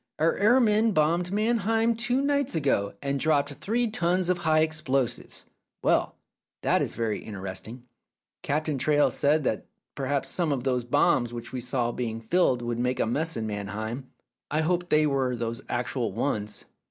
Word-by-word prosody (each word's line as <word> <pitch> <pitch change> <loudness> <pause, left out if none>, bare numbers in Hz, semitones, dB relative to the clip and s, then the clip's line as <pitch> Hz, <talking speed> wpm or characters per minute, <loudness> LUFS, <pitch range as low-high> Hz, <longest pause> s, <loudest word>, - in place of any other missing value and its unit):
Our 160 +2 +2
air 220 +6 +5
men 220 -1 +3
bombed 170 +3 +2
Mannheim 225 +2 +1
two 245 +3 +1
nights 280 -5 +1
ago, 130 -11 0
and 140 0 -1
dropped 145 -1 +2
three 235 - -1
tons 180 -3 +1
of 180 - -1
high 155 -2 +3
explosives. 135 -6 -1 0.4
Well, - - +2 0.5
that - - +3
is - - -2
very 115 -2 -1
interesting. 105 +4 -7 0.6
Captain 150 -1 -1
Traill 145 +2 +3
said 150 +2 +2
that 110 - -2 0.3
perhaps 140 0 -1
some 170 -4 +1
of 130 -4 -1
those 125 -2 0
bombs 120 0 +2
which 120 0 -7
we 130 - -4
saw 120 -1 0
being 115 -2 -3
filled 125 -1 +1
would 120 0 -2
make 125 +1 0
a - - +2
mess 155 +6 -1
in 110 - -2
Mannheim. 110 +5 -5 0.4
I 155 +2 +1
hope 175 +2 0
they 155 0 +4
were 135 -3 0
those 115 +1 -4
actual 120 -1 -1
ones." 105 -1 -3
140 Hz, 165 wpm, -27 LUFS, 120-175 Hz, 0.6 s, air